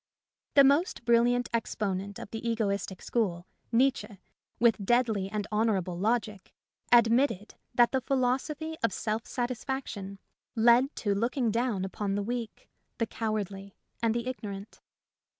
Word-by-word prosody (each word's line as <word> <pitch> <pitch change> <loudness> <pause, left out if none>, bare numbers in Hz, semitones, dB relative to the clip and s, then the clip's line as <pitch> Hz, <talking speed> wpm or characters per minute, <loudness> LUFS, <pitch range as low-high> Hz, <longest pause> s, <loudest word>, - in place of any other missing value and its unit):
The 280 - +9
most 280 -2 +2
brilliant 240 +1 +3
exponent 200 -3 -2
of - - -9
the 225 - -5
egoistic 200 -4 -2
school, 180 -7 -1 0.3
Nietszche, 245 -3 +1 0.4
with 225 -4 +3
deadly 220 -3 +1
and 210 0 -3
honourable 205 -5 +1
logic, 210 0 -2 0.4
admitted 235 -2 +4 0.2
that 240 -1 +5
the 265 - +1
philosophy 275 +5 -1
of 230 - +3
self 220 +1 -2
satisfaction 245 -5 -4 0.4
led 240 +5 +4
to 205 -2 0
look 235 +7 -1
ing 240 -4 +2
down 230 -4 0
upon 195 +1 -3
the 205 - -1
weak, 235 0 -5 0.3
the 230 - +1
cowardly, 200 -3 -4 0.3
and 230 -1 +1
the 235 0 -2
ignorant. 205 -5 -6
230 Hz, 135 wpm, -29 LUFS, 200-245 Hz, 0.4 s, The